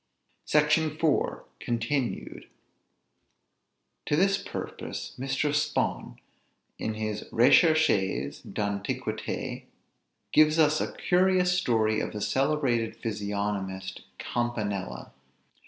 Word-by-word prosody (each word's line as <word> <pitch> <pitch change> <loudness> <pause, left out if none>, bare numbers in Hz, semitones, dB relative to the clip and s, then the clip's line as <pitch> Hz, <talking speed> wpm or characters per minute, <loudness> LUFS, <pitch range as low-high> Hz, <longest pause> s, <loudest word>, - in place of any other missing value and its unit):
SECTION 155 +1 +3
IV. 160 -3 +1 0.2
CONTINUED. 120 +2 -2 1.6
To 145 - +2
this 195 +4 +3
purpose - - -6
Mr. 135 +2 0
Spon, 150 0 -1 0.6
in 110 - -2
his 110 -1 -3
"Récherches 120 - +3
d'Antiquité," 100 -1 -3 0.7
gives 155 +1 +5
us 155 -1 +4
a - - -3
curious 180 0 +2
story 110 -10 +2
of - - -3
the 105 - -5
celebrated 130 -4 +1
physiognomist 100 -3 -3 0.2
Campanella. 105 - -3
120 Hz, 85 wpm, -28 LUFS, 105-155 Hz, 1.6 s, gives